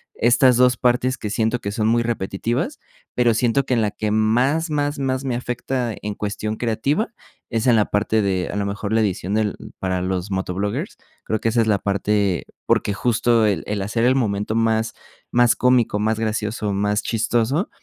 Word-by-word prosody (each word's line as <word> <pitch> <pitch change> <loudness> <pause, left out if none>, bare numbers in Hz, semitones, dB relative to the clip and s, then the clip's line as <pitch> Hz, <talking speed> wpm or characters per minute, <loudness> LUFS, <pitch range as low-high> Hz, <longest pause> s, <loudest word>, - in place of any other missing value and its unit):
estas 120 +1 +4
2, 125 -1 +4
partes 125 +1 +1
que 105 - -5
siento 110 +2 0
que 100 -3 -4
son 110 +1 0
muy 115 +1 +3
repetitivas, 120 - -2 0.4
pero, 120 -2 +3
siento 120 +4 +1
que 130 - -1
en 115 - +2
la 105 -1 0
que 105 0 -3
más 125 +10 +2
más 145 -1 -1
más 130 0 -1
me 125 -3 -1
afecta 125 -1 -3
en 105 0 -4
cuestión 105 +1 -3
creativa, 125 - 0 0.4
es 115 +1 -1
en 120 - +6
la 105 -2 +3
parte 110 +1 +1
de, 95 -2 -1
a - - -4
lo 100 - -1
mejor 100 +1 -3
la 115 - +3
edición 100 -2 -1
del 105 -2 0 0.2
para 95 -1 -1
los 95 +1 -2
motovloggers, 100 - -3 0.3
creo 110 - -1
que 115 - +1
esa 120 - +1
es 110 - 0
la 100 -2 +2
parte, 100 -2 0 0.2
porque, 100 - +2
justo 115 0 +2
el 95 -6 0
el 105 -1 -2
hacer 115 +4 -1
el 130 - +4
momento 105 -4 -1
más 115 0 +1 0.4
más 120 -1 +4
cómico, 125 -4 +2
más 110 +1 0
gracioso, 110 -1 -2
más 105 +1 0
chistoso, 120 - 0
110 Hz, 190 wpm, -21 LUFS, 105-125 Hz, 0.4 s, en